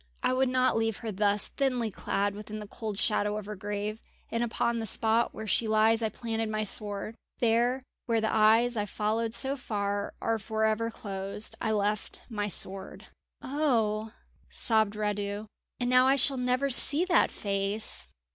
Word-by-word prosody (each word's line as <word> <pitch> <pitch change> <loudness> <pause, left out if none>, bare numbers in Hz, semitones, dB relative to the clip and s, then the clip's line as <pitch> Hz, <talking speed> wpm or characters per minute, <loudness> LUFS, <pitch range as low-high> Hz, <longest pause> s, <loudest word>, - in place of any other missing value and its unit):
I - - +2
would 260 0 +2
not 255 -1 +2
leave 225 -1 0
her 220 - -2
thus 205 +1 +2
thinly 250 -5 -1
clad 200 +1 -1
within 210 +1 -8
the 210 - -7
cold 215 0 -6
shadow 210 0 +1
of 215 - -6
her 210 +1 -6
grave; 205 +2 -4 0.3
and 230 +1 0
upon 235 0 -1
the 225 - -2
spot 225 +3 +2
where 220 - -8
she 220 +2 +1
lies 220 +1 +3
I 220 - 0
planted 225 0 -4
my 215 0 -1
sword. 210 +1 0 0.2
There, 240 +3 +1 0.2
where 230 -1 +2
the 220 0 -1
eyes 225 +3 +4
I 210 -2 -1
followed 220 +2 -1
so 270 +3 0
far 205 -5 -3
are 225 0 -1
for 220 +1 -1
ever 220 +1 0
closed, 200 -1 -5
I - - -1
left 210 0 -2
my 210 -2 -2
sword." 190 0 +2 0.3
"Oh," 225 -7 0 0.4
sobbed 220 -2 +2
Radu, 205 0 -3 0.3
"and 245 - -1
now 255 +1 +5
I 270 - +4
shall 275 0 +4
never 250 +2 0
see 290 +6 +4
that 360 -2 +3
face!" 195 - 0
220 Hz, 175 wpm, -28 LUFS, 210-235 Hz, 0.4 s, now